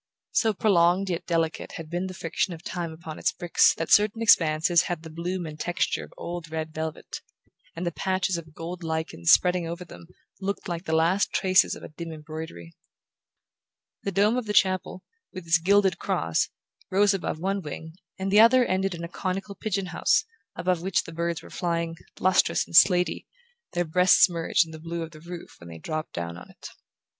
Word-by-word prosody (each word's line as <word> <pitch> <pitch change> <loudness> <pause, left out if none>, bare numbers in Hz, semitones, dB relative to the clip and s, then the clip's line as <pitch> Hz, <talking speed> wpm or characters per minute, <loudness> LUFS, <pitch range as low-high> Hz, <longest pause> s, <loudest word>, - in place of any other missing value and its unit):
So 220 -2 +2
prolonged 185 -1 +3
yet 170 - -4
delicate 165 -2 -1
had 165 - -7
been 175 +3 -3
the 185 - -8
friction 170 +2 -2
of 160 - -15
time 170 -2 -4
upon 160 -1 -9
its - - +1
bricks 175 -2 +3
that 165 - -4
certain 210 +2 +5
expanses 165 -5 +4
had 175 -2 -3
the 160 - -9
bloom 175 +2 -3
and 155 -1 -8
texture 175 +2 -1
of - - -13
old 170 -1 -6
red 160 0 -4
velvet, 160 0 -5 0.5
and 170 +2 -4
the 170 - 0
patches 185 +1 -1
of 160 -2 -8
gold 175 +2 -6
lichen 160 - -4
spreading 180 - +4
over 170 +2 -6
them 165 - -13 0.3
looked 200 +2 -3
like 170 0 -4
the 160 - 0
last 170 +5 +2
traces 185 -1 +3
of - - -12
a - - -8
dim 165 +2 -7
embroidery. 155 - -8 1.3
The 200 - -3
dome 205 +5 +3
of 245 -3 -3
the 210 - -1
chapel, 185 -1 +1 0.3
with 185 -2 -8
its 165 +1 +4
gilded 195 +1 +3
cross, 80 0 0 0.4
rose 200 +1 +4
above 190 -4 -3
one 195 +4 -1
wing, 160 +1 -8 0.2
and 190 0 -3
the 205 - +6
other 245 +3 +7
ended 190 -2 0
in 170 - -7
a - - -3
conical 190 +3 -4
pigeon 195 -1 -2
house, 175 - +1 0.3
above 180 -2 0
which 190 +1 0
the 165 - -10
birds 170 0 -2
were - - -13
flying, 170 -1 -2 0.2
lustrous 185 0 +3
and - - -8
slatey, 180 +1 +5 0.5
their 175 0 0
breasts 180 +3 +5
merged 170 -1 +1
in 160 - -12
the 160 - -9
blue 165 +1 -4
of 165 - -8
the 155 -1 -14
roof 170 +1 -9
when 85 - -12
they 80 - -9
dropped 155 - -5
down 85 0 -5
on - - -12
it. - - -11
170 Hz, 195 wpm, -26 LUFS, 160-185 Hz, 1.3 s, other